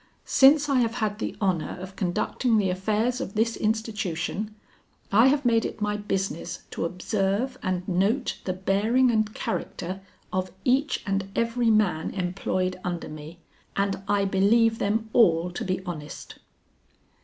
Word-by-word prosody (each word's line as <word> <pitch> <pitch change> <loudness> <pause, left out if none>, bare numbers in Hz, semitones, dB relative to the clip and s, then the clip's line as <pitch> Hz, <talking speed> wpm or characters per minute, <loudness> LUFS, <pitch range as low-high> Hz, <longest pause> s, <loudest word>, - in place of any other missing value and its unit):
"Since 285 +2 +6
I 275 -3 +3
have 230 -1 +1
had 215 -1 -1
the - - -3
honor 185 -4 0
of 190 +1 -8
conducting 215 +5 0
the 195 -3 +2
affairs 215 +6 0
of 195 - -5
this 225 +2 +1
institution, 215 -2 -2 0.6
I 225 +6 +6
have 280 0 +2
made 230 -2 +4
it - - -5
my 210 0 0
business 195 -3 -3
to - - -2
observe 195 +7 -1
and 185 -2 -2
note 200 +8 0
the 185 - -1
bearing 210 +7 +2
and 215 -1 +1
character 185 +3 -4 0.3
of 185 0 -1
each 270 +4 +2
and 195 -1 -1
every 230 0 +1
man 205 -7 +2
employed 185 0 -1
under 175 -3 -3
me, 155 +3 -10 0.3
and 195 -1 0
I 205 -1 +2
believe 220 +4 +3
them 220 +2 0
all 175 -6 +4
to 175 - -4
be 185 0 -2
honest." 155 -5 -7
200 Hz, 150 wpm, -26 LUFS, 185-225 Hz, 0.6 s, Since